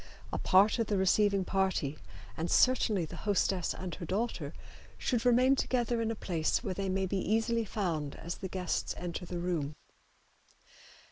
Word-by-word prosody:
A - - -1
part 200 +5 +4
of 230 - +1
the 205 - +1
receiving 195 +1 +3
party, 190 -7 0 0.4
and 165 +2 -2
certainly 220 -8 +3
the - - -9
hostess 195 -3 +1
and 180 -2 -5
her 175 - -6
daughter, 225 +7 -2 0.5
should 245 -1 0
remain 255 +3 +5
together 240 -3 0
in 225 - 0
a 225 - -2
place 170 -1 -1
where 195 -5 -2
they 195 +1 -2
may 190 +1 0
be 195 +1 -1
easily 225 +3 +1
found 165 -9 -2
as 170 +1 -6
the 190 - -6
guests 180 -1 -2
enter 175 0 -5
the 175 - -4
room. 165 -4 -2
190 Hz, 165 wpm, -31 LUFS, 175-225 Hz, 0.5 s, remain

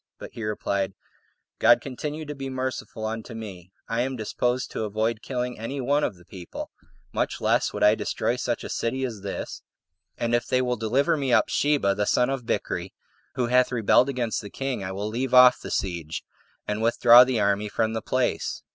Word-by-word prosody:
But - - -9
he 115 - -7
replied, 100 -2 -1 0.7
"God 120 0 +6
continue 150 +4 -5
to 150 - -5
be 135 -1 -6
merciful 130 -4 -4
unto 115 +1 -5
me: 95 -5 -9 0.2
I 115 +1 0
am 130 +1 -2
disposed 125 +2 -1
to - - -3
avoid 110 +2 -1
killing 125 -2 -3
any 130 +5 -4
one 145 +3 +1
of - - -1
the 85 -1 -19
people, 90 -1 -8 0.4
much - - -1
less - - +2
would - - -2
I 105 0 +7
destroy 115 - -1
such 120 -1 -2
a - - -6
city 130 +3 -2
as 110 -6 -6
this; 100 0 -5 0.6
and 120 0 -1
if 120 - +1
they 130 - +2
will 125 -1 0
deliver 125 +8 +1
me 135 -3 -1
up 115 -2 +4
Sheba, 145 -9 +2
the 105 +1 -1
son 125 +2 +2
of 130 -4 -4
Bichri, - - -2 0.4
who 125 -2 +1
hath 125 +2 +3
rebelled 125 +2 +4
against 120 -5 -1
the 105 - -8
king, 135 -2 -3
I 95 - -4
will 100 +2 -3
leave 125 +4 -1
off 125 0 +8
the - - -7
siege, 85 -4 -3 0.4
and 105 +1 -2
withdraw 120 +1 +7
the 125 -2 0
army 100 +1 +1
from 110 +1 0
the 110 - -2
place." 130 +1 -1
120 Hz, 200 wpm, -25 LUFS, 105-130 Hz, 0.7 s, off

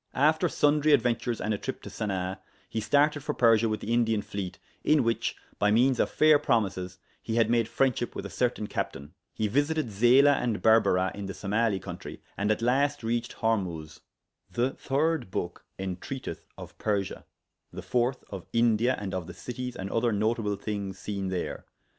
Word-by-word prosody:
After 155 +5 +3
sundry 150 0 +3
adventures 120 -2 +1
and 110 - -1
a 100 - -3
trip - - -5
to - - -7
Sanaa, 95 -2 -3 0.3
he 110 - -3
started 145 +5 +3
for 150 +2 -3
Persia 115 -2 +4
with 110 - -2
the 115 - -2
Indian 115 -3 +2
fleet, 100 -3 -5 0.3
in 150 -3 +4
which, 115 0 0 0.2
by 105 - +3
means 125 +4 +3
of - - +2
fair 155 -1 +5
promises, 95 -9 0 0.2
he 115 - -3
had 115 -1 +3
made 115 -2 +2
friendship 120 0 0
with - - -5
a - - -5
certain 120 -4 0
captain. 75 -6 -4 0.2
He 110 - 0
visited 145 +2 0
Zayla 125 +7 +6
and 115 -3 -1
Berberah 95 -5 +3
in 100 -1 -6
the 95 - -6
Somali 105 0 0
country, 90 -1 -8 0.2
and 100 +1 -1
at 110 +2 +1
last 140 +3 +1
reached 115 +1 -2
Hormuz. 90 -9 -1 0.5
The 125 +2 0
3rd 145 -3 -1
book 90 -1 -4
entreateth 95 +8 -5
of - - -10
Persia, 100 -3 -2 0.5
the - - -8
4th 125 +1 0
of 95 -3 -7
India, 115 +1 +3
and 100 -2 -5
of 90 -3 -3
the - - -9
cities 125 0 -6
and 95 +1 -5
other 115 +1 +1
notable 105 -1 0
thynges 100 -2 -4
seene 100 0 -4
there. 95 -2 -3
115 Hz, 175 wpm, -28 LUFS, 100-125 Hz, 0.5 s, Zayla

